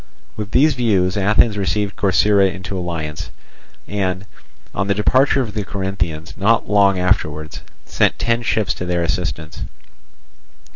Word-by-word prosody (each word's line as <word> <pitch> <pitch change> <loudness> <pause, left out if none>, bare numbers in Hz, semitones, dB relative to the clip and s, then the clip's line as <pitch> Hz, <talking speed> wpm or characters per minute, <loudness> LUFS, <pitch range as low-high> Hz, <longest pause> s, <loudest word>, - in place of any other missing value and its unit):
With 105 -1 -5
these 145 +7 +4
views, 100 -7 +1
Athens 105 +2 +3
received 100 +1 -1
Corcyra 100 0 +3
into 95 0 -6
alliance 80 -5 -4 0.6
and, 95 -1 -2 0.5
on 100 +1 -1
the 100 - +1
departure 130 +6 +3
of 110 -5 -4
the 105 -1 -2
Corinthians 95 -5 -4
not 110 +4 +2
long 100 -2 +4
afterwards, 80 -4 -1 0.2
sent - - +1
ten 115 0 0
ships 105 -4 0
to 90 - -6
their 90 -1 0
assistance. 85 -2 -3
100 Hz, 135 wpm, -19 LUFS, 90-105 Hz, 0.6 s, these